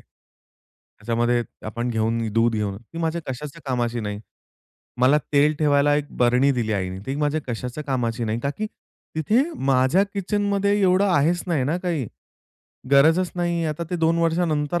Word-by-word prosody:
त्याच्यामध्ये 120 Hz, +2 st, -5 dB, 0.2 s
आपण 120 Hz, +3 st, -3 dB
घेऊन 115 Hz, +1 st, 0 dB
दूध 115 Hz, +1 st, +3 dB
घेऊन 105 Hz, -2 st, -2 dB
ती 120 Hz, +9 st, -11 dB
माझ्या 165 Hz, 0 st, -1 dB
कशाच्या 145 Hz, +5 st, -6 dB
कामाची 120 Hz, -2 st, -1 dB
नाही. 105 Hz, -1 st, -4 dB, 0.8 s
मला 135 Hz, +4 st, +5 dB
तेल 150 Hz, +1 st, +4 dB
ठेवायला 145 Hz, -1 st, +3 dB
एक 145 Hz, -1 st, -2 dB
बरणी 125 Hz, +3 st, +4 dB
दिली 115 Hz, -4 st, -1 dB
आईनी, 95 Hz, -1 st, -2 dB
ती 135 Hz, -, -2 dB
माझ्या 150 Hz, +1 st, 0 dB
कशाच्या 125 Hz, +5 st, -4 dB
कामाची 120 Hz, -4 st, -1 dB
नाही. 110 Hz, +2 st, -2 dB
का 140 Hz, -, -1 dB
की 215 Hz, -, -1 dB, 0.5 s
तिथे 215 Hz, -, +3 dB, 0.3 s
माझ्या 130 Hz, +8 st, +4 dB
किचनमध्ये 200 Hz, +1 st, 0 dB
एवढं 190 Hz, +1 st, +4 dB
आहेच 165 Hz, +5 st, +2 dB
नाही 155 Hz, -7 st, 0 dB
ना 155 Hz, +6 st, 0 dB
काही, 170 Hz, -, -2 dB, 0.8 s
गरजच 160 Hz, +6 st, +4 dB
नाही 170 Hz, -1 st, 0 dB
आता 155 Hz, +2 st, -3 dB
ते 180 Hz, -, -1 dB
2 165 Hz, 0 st, +2 dB
वर्षानंतर 165 Hz, -1 st, +1 dB
145 Hz, 155 wpm, -23 LUFS, 120-170 Hz, 0.8 s, मला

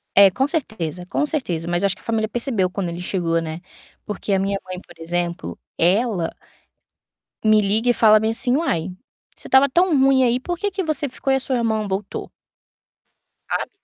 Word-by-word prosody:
É, 200 Hz, 0 st, +8 dB
com 265 Hz, +7 st, 0 dB
certeza, 180 Hz, -, -3 dB
com 290 Hz, -, -1 dB
certeza, 180 Hz, -, -2 dB
mas 175 Hz, +1 st, 0 dB
eu 200 Hz, -, +5 dB
acho 195 Hz, -, 0 dB
que -, -, -20 dB
a -, -, -23 dB
família 220 Hz, -1 st, 0 dB
percebeu 225 Hz, -5 st, 0 dB
quando 185 Hz, -1 st, -3 dB
ele 170 Hz, +1 st, -6 dB
chegou, 170 Hz, -2 st, 0 dB
né, 160 Hz, +1 st, -6 dB, 0.4 s
porque 210 Hz, 0 st, -3 dB
a 195 Hz, -, +3 dB
minha 195 Hz, +1 st, 0 dB
mãe, 185 Hz, -1 st, -6 dB
por 170 Hz, -1 st, -18 dB
exemplo, 175 Hz, +1 st, -3 dB, 0.2 s
ela 185 Hz, -1 st, +1 dB, 1.1 s
me 215 Hz, 0 st, +5 dB
liga 215 Hz, +4 st, +1 dB
e 245 Hz, -, +5 dB
fala 215 Hz, -2 st, +6 dB
bem, 220 Hz, +1 st, 0 dB
assim: 250 Hz, +3 st, +2 dB
"Uai, 180 Hz, -, -1 dB, 0.4 s
se -, -, -6 dB
estava 265 Hz, +1 st, +5 dB
tão 340 Hz, +2 st, +3 dB
ruim 265 Hz, -1 st, +4 dB
aí, 245 Hz, 0 st, +2 dB
por 350 Hz, +6 st, -4 dB
que 410 Hz, -, -1 dB
que 385 Hz, 0 st, -2 dB
você 305 Hz, -3 st, +1 dB
ficou 270 Hz, +1 st, -3 dB
e 270 Hz, -, +4 dB
a -, -, -2 dB
sua 265 Hz, 0 st, -1 dB
irmã 220 Hz, -3 st, 0 dB
voltou?" 195 Hz, +1 st, -4 dB, 1.2 s
Sabe? -, -, -2 dB
215 Hz, 200 wpm, -21 LUFS, 180-260 Hz, 1.2 s, É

